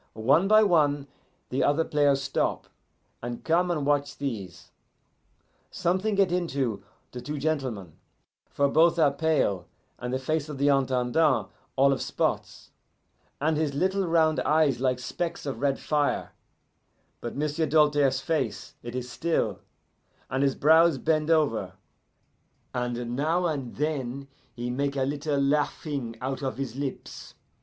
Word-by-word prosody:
One 140 - +3
by 215 +1 +6
one 145 -7 +2 0.4
the 130 - 0
other 150 +3 +2
players 145 -2 +2
stop, 135 - -1 0.6
and 120 0 -6
come 175 +2 +2
and 155 -5 -1
watch 145 0 0
these. 100 -11 -6 1.0
Something 190 +4 0
get 195 -3 +3
into 135 - -1 0.3
the 125 - -7
two 150 +3 -5
gentlemen, 130 - -2 0.6
for 140 - +1
both 165 +4 +4
are 155 -4 +4
pale, 140 - 0 0.3
and 125 0 -4
the 130 - 0
face 155 +3 -2
of 150 - -6
the 140 +1 +2
Intendant 135 +2 +2 0.2
all 140 +1 +4
of - - -3
spots, - - -2 0.7
and 155 +1 +1
his 150 -3 -1
little 190 +4 +1
round 160 -2 +3
eyes 155 -3 +2
like 130 -1 +1
specks 170 +7 -4
of 140 -2 -4
red 140 -1 +1
fire; 150 -2 0 0.9
but 120 - -6
M'sieu' 150 +2 0
Doltaire's 145 -3 +3
face, 145 -10 -2
it 120 +1 -7
is 125 -1 -3
still, 120 - -1 0.7
and 135 - 0
his 140 -1 +2
brows 160 0 +5
bend 155 +2 0
over, 125 - +1 1.0
and 120 -1 -3
now 160 +6 +1
and 140 -7 -3
then 140 -2 -3 0.3
he 120 0 -3
make 140 +2 -1
a 135 - +1
little 145 +1 -1
laughing 140 -3 -1
out 130 +2 -3
of 135 -2 -3
his 135 -4 -4
lips. 140 -1 -6
140 Hz, 145 wpm, -27 LUFS, 130-160 Hz, 1.0 s, by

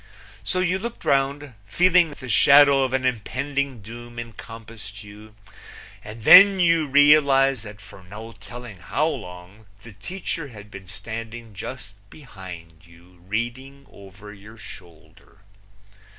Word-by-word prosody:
So 185 - -1
you 185 +1 0
looked 235 +3 -8
round, 140 0 0
feeling 175 - +3
that 145 - -13
the 130 - -8
shadow 140 +8 +5
of 130 -1 0
an 130 0 -1
impending 130 +1 -3
doom 120 +2 -11
encompassed 115 -2 -10
you, 105 +1 -14 0.7
and 110 +1 -11
then 195 - +8
you 165 -3 +2
realized 140 -2 +4
that 105 0 -11
for 100 -1 -15
no 105 +5 -11
telling 115 -1 -11
how 140 - -2
long 100 - -7 0.2
the 115 - -13
teacher 165 - -6
had 105 -4 -14
been 95 -2 -11
standing 115 +4 -8
just 110 +2 -9 0.2
behind 90 - -12
you, 85 +1 -21
reading 130 +6 -5
over 100 +1 -14
your 105 +3 -15
shoulder. 90 -1 -15
115 Hz, 135 wpm, -23 LUFS, 100-140 Hz, 0.7 s, then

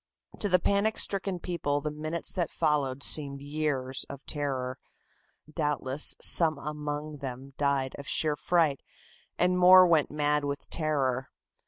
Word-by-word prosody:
To 205 - -1
the 180 - +4
panic 200 +4 0
stricken 195 -1 -3
people 155 -5 -2
the 150 +1 -4
minutes 155 +2 -5
that 175 -3 -2
followed 140 -3 -1
seemed 140 -2 +4
years 140 -3 -3
of 140 0 -10
terror. 135 -3 -4 0.7
Doubtless 150 -3 +1
some 160 -3 +6
among 150 0 -6
them 135 0 -8
died 140 -2 -1
of 140 - -10
sheer 155 -2 +1
fright 155 -1 0 0.6
and 180 0 +1
more 185 +1 +8
went 165 -4 +2
mad 150 0 0
with 140 0 -5
terror. 135 -5 -1
150 Hz, 140 wpm, -28 LUFS, 140-165 Hz, 0.7 s, more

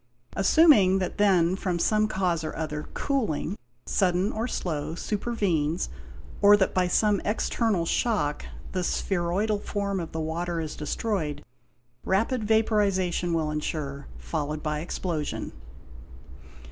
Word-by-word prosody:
Assuming 245 - +5
that 185 +1 -3
then, 185 -4 +4
from 185 -2 -2
some 215 +4 +2
cause 180 -5 0
or 155 - -4
other, 150 -1 -4
cooling—sudden 180 - -1
or 225 +3 -2
slow—supervenes, 170 0 -1 0.5
or 205 0 +8
that 190 - +1
by 185 -1 +2
some 205 +2 +2
external 210 -3 0
shock 165 -8 0 0.3
the 185 -1 -1
spheroidal 195 +4 0
form 200 -1 -2
of 165 -2 -5
the 160 - -4
water 165 +2 -2
is 155 -2 -4
destroyed, 150 -2 -2 0.6
rapid 225 +5 +1
vaporization 200 -5 +2
will 160 -2 0
ensure, 150 -2 -4
followed 145 - -4
by 150 -1 -1
explosion. 160 -2 -3
180 Hz, 115 wpm, -26 LUFS, 155-205 Hz, 0.6 s, or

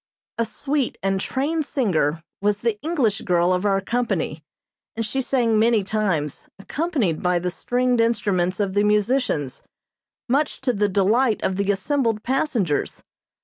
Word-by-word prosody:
A 230 - +2
sweet 275 +4 -2
and 195 0 0
trained 300 +7 -1
singer 170 - 0 0.2
was 205 0 +1
the 225 -3 -1
English 275 -11 0
girl 175 0 +2
of 180 +2 -1
our 195 -1 +3
company, 240 +5 -2 0.5
and 225 0 -2
she 265 +5 -1
sang 235 -4 +1
many 225 -2 +3
times, 190 -8 -2
accompanied 240 - -1
by 180 0 +2
the 180 +1 -2
stringed 245 +4 +1
instruments 200 -5 0
of 200 -2 0
the 205 +1 +2
musicians, 210 - +1 0.7
much 285 +5 +1
to 260 -2 +1
the 205 -1 +1
delight 215 +5 +2
of 190 - 0
the 200 +1 -1
assembled 225 +1 0
passengers. 245 - -1
215 Hz, 145 wpm, -23 LUFS, 190-250 Hz, 0.7 s, our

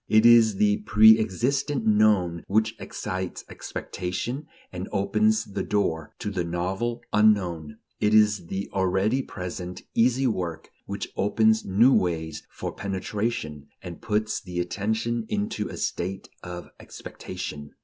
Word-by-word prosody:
It 110 +1 +4
is 115 -3 +7
the 105 +1 +3
preexistent 110 +6 +3
"known" 105 -6 +3
which 110 +2 +1
excites 95 -1 -5
expectation 120 +11 -5 0.3
and 90 +1 -5
opens 110 +2 +2
the 100 - -4
door 80 -7 -1
to 105 - -4
the 90 -3 -1
novel 95 +8 -2
"unknown"; 90 -8 +2
and - - -23 0.2
it 105 +1 +3
is 105 -4 +4
the 95 +2 -3
already 95 +6 +1
present 90 -4 -7
"easy 125 +3 +3
work" 85 -9 -2 0.2
which - - -4
opens 110 +2 +2
new 115 +8 +5
ways 80 -3 0
for - - -6
penetration, 95 -6 -3 0.2
and 85 -3 -8
puts 110 0 -1
the 90 -1 -5
attention 110 +5 -1
into 105 0 -2
a - - -7
state 95 +2 -3
of 90 -1 -8
expectation. 75 -1 -8
100 Hz, 130 wpm, -26 LUFS, 90-110 Hz, 0.3 s, is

